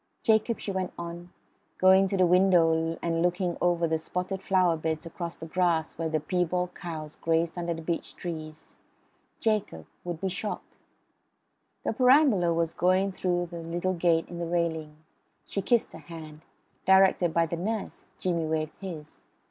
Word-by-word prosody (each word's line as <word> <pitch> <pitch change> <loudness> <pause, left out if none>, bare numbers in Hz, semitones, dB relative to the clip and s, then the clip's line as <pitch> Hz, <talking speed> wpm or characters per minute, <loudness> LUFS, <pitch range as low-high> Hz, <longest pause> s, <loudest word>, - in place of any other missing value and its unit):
"Jacob," 220 0 +3
she 200 - -4
went 190 -1 -2
on, 170 +1 -7 0.5
going 190 +1 +6
to 195 - -1
the 185 - +5
window 165 -3 +4
and 165 -1 0
looking 175 0 0
over 175 -1 +2
the 160 0 0
spotted 180 +4 -3
flower 185 -4 +3
beds 160 0 -3
across 170 0 -6
the 165 - -7
grass 165 -2 0
where 165 0 -2
the 155 0 0
piebald 180 +2 -1
cows 155 -4 -7
grazed 165 +1 0
under 170 -1 -2
beech 165 +1 -4
trees, 155 -3 -7 0.6
"Jacob 210 - -1 0.2
would 175 -2 -4
be 195 - -1
shocked." 200 +3 -5 1.1
The - - 0
perambulator 250 - +5
was 165 -1 0
going 185 +2 +2
through 175 -2 -1
the 170 - -6
little 175 +3 -2
gate 165 -2 +2
in 175 - -7
the 170 - -2
railing. 160 -3 -1 0.5
She 200 - -3
kissed 235 +3 +1
her - - -9
hand; 155 0 -11 0.4
directed 190 -2 +5
by 165 +1 +3
the 165 +1 -4
nurse, 215 +4 -4
Jimmy 170 -3 -1
waved 155 0 -2
his. 160 -6 -8
175 Hz, 160 wpm, -28 LUFS, 165-185 Hz, 1.1 s, going